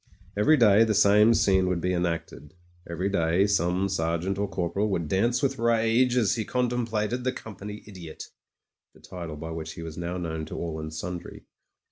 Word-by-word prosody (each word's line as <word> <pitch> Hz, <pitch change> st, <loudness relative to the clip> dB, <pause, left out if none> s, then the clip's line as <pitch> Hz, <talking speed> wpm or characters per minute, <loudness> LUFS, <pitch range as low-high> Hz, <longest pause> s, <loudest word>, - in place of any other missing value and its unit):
Every 105 Hz, +10 st, +4 dB
day 110 Hz, -3 st, +6 dB
the 110 Hz, -2 st, +1 dB
same 105 Hz, +2 st, +5 dB
scene 95 Hz, -2 st, +3 dB
would 90 Hz, -1 st, 0 dB
be 90 Hz, +2 st, -1 dB
enacted; 85 Hz, -3 st, -3 dB, 0.3 s
every 85 Hz, +2 st, -3 dB
64 -, -, +3 dB
MEN, -, -, -2 dB
WOMEN 80 Hz, -4 st, +1 dB
AND 95 Hz, -, +4 dB
GUNS 100 Hz, -, +1 dB
day -, -, +2 dB
some 95 Hz, +1 st, +1 dB
sergeant 85 Hz, +1 st, -1 dB
or 100 Hz, -, 0 dB
corporal 95 Hz, +3 st, -1 dB
would 85 Hz, -5 st, -1 dB
dance 115 Hz, -, +1 dB
with 135 Hz, -, 0 dB
rage 115 Hz, +2 st, +2 dB
as 110 Hz, -5 st, +3 dB
he 110 Hz, -, -1 dB
contemplated 120 Hz, -1 st, -1 dB
the 130 Hz, -, +1 dB
Company 105 Hz, -3 st, -9 dB
Idiot 90 Hz, -6 st, -9 dB, 0.4 s
— -, -, -56 dB
^the -, -, -17 dB
title 85 Hz, -4 st, -7 dB
by 80 Hz, +2 st, -7 dB
which 80 Hz, -1 st, -6 dB
he 85 Hz, -, -8 dB
was 80 Hz, 0 st, -7 dB
now 85 Hz, +1 st, -3 dB
known 80 Hz, -3 st, -4 dB
to -, -, -7 dB
all 80 Hz, -2 st, -4 dB
and 80 Hz, 0 st, -6 dB
sundry. 85 Hz, +3 st, -7 dB
95 Hz, 210 wpm, -26 LUFS, 85-110 Hz, 0.4 s, day